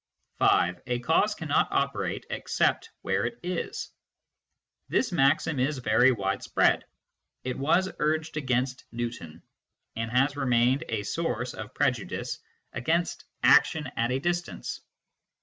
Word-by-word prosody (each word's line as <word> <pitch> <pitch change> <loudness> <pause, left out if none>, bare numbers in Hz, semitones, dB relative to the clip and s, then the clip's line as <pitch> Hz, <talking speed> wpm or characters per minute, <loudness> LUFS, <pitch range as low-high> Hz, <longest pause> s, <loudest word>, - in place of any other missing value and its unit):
(5) 90 0 +3
" - - -24
A 125 0 0
cause 120 - +2
cannot - - +1
operate - - -1
except - - 0
where 95 +1 0
it 120 0 -3
is." 180 -1 -4 1.0
This 255 - +1
maxim 150 -1 +2
is 140 +3 +1
very 125 +1 +4
widespread; 100 -5 +1 0.6
it 125 0 -3
was 165 +7 +2
urged 155 +1 0
against 130 -3 -1
Newton, 115 -9 -6 0.5
and 115 0 -3
has 135 +4 +2
remained 130 +2 +2
a 110 -2 -1
source 125 -2 -2
of - - -8
prejudice - - -1 0.3
against 165 +7 -1
" - - -41
action 150 -5 +4
at 115 +1 +1
a 130 - +1
distance." 175 +4 -3
130 Hz, 130 wpm, -27 LUFS, 120-155 Hz, 1.0 s, very